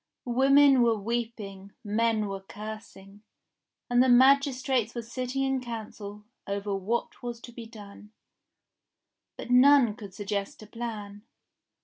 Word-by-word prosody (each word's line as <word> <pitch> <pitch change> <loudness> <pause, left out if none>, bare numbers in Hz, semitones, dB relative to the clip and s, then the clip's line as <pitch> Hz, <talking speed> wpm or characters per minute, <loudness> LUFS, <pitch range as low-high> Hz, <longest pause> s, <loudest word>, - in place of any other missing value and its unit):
Women 270 +2 +5
were 230 -2 +3
weeping, 210 -3 -5
men 220 0 +1
were 195 -1 -4
cursing, 205 -1 -10 0.7
and 245 0 +3
the 260 - +4
magistrates 260 -2 +3
were 235 - -4
sitting 255 +3 -3
in 270 -1 0
Council 210 -3 -8 0.2
over 200 +1 -3
what 200 +5 -3
was 240 -1 -5
to 240 - -11
be 235 -1 -9
done. 210 -2 -13 1.3
But - - -7
none 255 -2 +6
could 205 -5 -11
suggest 205 0 -4
a - - -11
plan. 210 -2 -7
230 Hz, 125 wpm, -28 LUFS, 205-250 Hz, 1.3 s, none